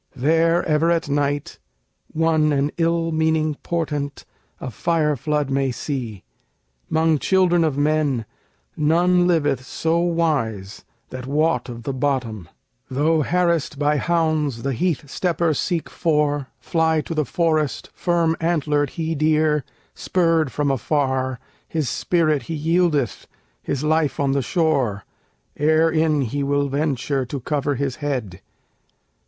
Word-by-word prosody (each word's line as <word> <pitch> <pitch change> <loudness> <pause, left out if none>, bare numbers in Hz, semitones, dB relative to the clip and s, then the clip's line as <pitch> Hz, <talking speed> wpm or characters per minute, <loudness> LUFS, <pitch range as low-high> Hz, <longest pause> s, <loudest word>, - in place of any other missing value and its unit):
There 165 +5 +2
ever 155 +1 +2
at 165 -3 0
night 145 0 -1 0.5
one 160 -1 +2
an 145 +1 +1
ill 165 0 +1
meaning 160 -1 +1
portent, 150 -4 -3 0.3
A 130 - -6
fire 150 +5 +1
flood 150 +1 -1
may 135 0 +1
see; 120 - -5 0.7
'mong 160 -1 +2
children 180 -1 +3
of 150 -4 0
men 145 -5 +1 0.5
None 175 +4 +3
liveth 145 -7 +1
so 160 +5 -1
wise 145 - -1 0.3
that 130 0 -7
wot 145 -3 +1
of 120 -1 -8
the 140 - -3
bottom; 125 - -2 0.4
Though 155 +4 +2
harassed 170 -2 0
by 150 +1 +2
hounds 155 -6 0
the 135 0 -1
heath 155 0 -1
stepper 170 +1 0
seek 170 +2 -1
for, 150 -4 0
Fly 160 -1 +1
to 165 - -6
the 155 -1 +1
forest, 155 0 -1
firm 170 -2 +1
antlered 150 -4 +1
he 165 0 -1
deer, 155 -1 +2 0.3
Spurred 165 -5 +1
from 145 -1 0
afar, 130 -1 -1 0.3
his 155 -6 -2
spirit 155 -3 +1
he 165 - -2
yieldeth, 155 -4 0 0.3
His 140 +1 -3
life 155 -1 +1
on 140 -1 +1
the 140 0 +1
shore, 135 - 0 0.5
ere 155 +2 +3
in 155 -2 +2
he 135 +3 -2
will 140 0 0
venture 140 -1 -1
To 140 +3 -4
cover 145 +2 -1
his 135 -1 -2
head. 125 -11 -4
150 Hz, 135 wpm, -22 LUFS, 140-165 Hz, 0.7 s, children